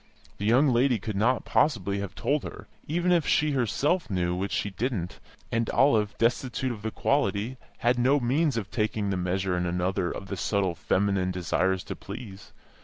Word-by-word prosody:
This 105 Hz, -, -1 dB
young 130 Hz, +6 st, +5 dB
lady 125 Hz, 0 st, +3 dB
could 105 Hz, +1 st, -5 dB
not 115 Hz, +4 st, +1 dB
possibly 100 Hz, -, +1 dB
have 100 Hz, 0 st, -5 dB
told 145 Hz, 0 st, 0 dB
her -, -, -8 dB, 0.2 s
(even 175 Hz, +4 st, +1 dB
if 170 Hz, -3 st, +3 dB
she 150 Hz, 0 st, +3 dB
herself 140 Hz, -, 0 dB
knew, 90 Hz, -3 st, 0 dB
which 95 Hz, +2 st, -3 dB
she 100 Hz, -, -1 dB
didn't), 100 Hz, -4 st, -3 dB, 0.3 s
and 115 Hz, 0 st, 0 dB
Olive, 110 Hz, -7 st, +3 dB
destitute 125 Hz, +2 st, 0 dB
of 110 Hz, -3 st, -7 dB
the 110 Hz, -, -2 dB
quality, 115 Hz, -1 st, 0 dB, 0.2 s
had 120 Hz, +1 st, +1 dB
no 135 Hz, +4 st, +4 dB
means 135 Hz, +2 st, +1 dB
of 105 Hz, -2 st, -4 dB
taking 105 Hz, -2 st, -1 dB
the -, -, 0 dB
measure 90 Hz, +1 st, -1 dB
in 90 Hz, 0 st, -1 dB
another 90 Hz, +1 st, 0 dB
of 100 Hz, -, -6 dB
the 100 Hz, -, -4 dB
subtle 100 Hz, -3 st, 0 dB
feminine 95 Hz, +2 st, 0 dB
desire 95 Hz, +1 st, 0 dB
to 90 Hz, -, -7 dB
please. 100 Hz, -5 st, -9 dB
105 Hz, 180 wpm, -27 LUFS, 95-130 Hz, 0.3 s, young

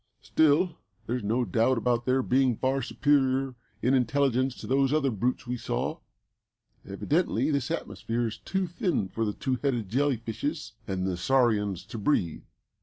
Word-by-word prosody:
Still, 160 Hz, +3 st, +3 dB, 0.3 s
there's 120 Hz, +2 st, -2 dB
no 115 Hz, +4 st, +1 dB
doubt 115 Hz, +6 st, +2 dB
about 120 Hz, +1 st, 0 dB
their 130 Hz, +1 st, +3 dB
being 130 Hz, -1 st, +2 dB
far 135 Hz, +3 st, 0 dB
superior 135 Hz, 0 st, +1 dB, 0.3 s
in 125 Hz, -, +3 dB
intelligence 130 Hz, 0 st, +2 dB
to -, -, -9 dB
those 135 Hz, 0 st, +2 dB
other 145 Hz, -3 st, +2 dB
brutes 120 Hz, +5 st, -1 dB
we 125 Hz, +1 st, -3 dB
saw. -, -, -2 dB, 0.8 s
Evidently 140 Hz, -, 0 dB
this 140 Hz, -2 st, 0 dB
atmosphere 120 Hz, -7 st, -2 dB
is 110 Hz, -, -4 dB
too 190 Hz, 0 st, -1 dB
thin 175 Hz, -, -1 dB
for 115 Hz, +4 st, -2 dB
the 105 Hz, -, -1 dB
two 130 Hz, +2 st, -2 dB
headed 120 Hz, -8 st, -1 dB
jelly 135 Hz, +3 st, +1 dB
fishes 140 Hz, +8 st, -4 dB
and 95 Hz, -1 st, -2 dB
the 95 Hz, -2 st, -1 dB
saurians 105 Hz, -3 st, +1 dB
to 115 Hz, -, -7 dB
breathe. 100 Hz, -, 0 dB
130 Hz, 160 wpm, -28 LUFS, 115-140 Hz, 0.8 s, Still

